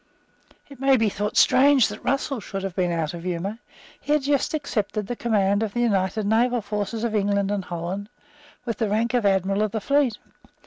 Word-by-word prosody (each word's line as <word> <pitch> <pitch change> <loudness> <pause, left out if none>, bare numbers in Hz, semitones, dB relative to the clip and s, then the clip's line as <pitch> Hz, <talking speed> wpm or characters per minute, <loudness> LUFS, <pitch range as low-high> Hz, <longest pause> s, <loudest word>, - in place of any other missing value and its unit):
It 275 -3 -14
may 270 0 +4
be 225 -2 +2
thought 205 +2 -3
strange 270 -2 +5
that - - -9
Russell 275 0 -1
should 195 -2 -6
have 195 -2 -4
been 180 -2 0
out 165 -1 -2
of 170 - -7
humour. 185 +5 -3 0.4
He 295 - -1
had 300 -2 +2
just 285 +2 +1
accepted 215 -8 -2
the 245 - -4
command 205 -3 +1
of 220 -1 -3
the 240 - +1
united 200 -2 0
naval 235 +2 +2
forces 210 +2 -3
of 235 -2 -1
England 200 -1 +1
and 205 -2 -1
Holland 180 +4 -5 0.6
with 230 -3 -3
the 220 -3 0
rank 225 +4 0
of 240 -5 +2
Admiral 195 +1 +1
of 215 - +1
the 220 - 0
Fleet. 275 -1 +1
210 Hz, 205 wpm, -24 LUFS, 195-240 Hz, 0.6 s, strange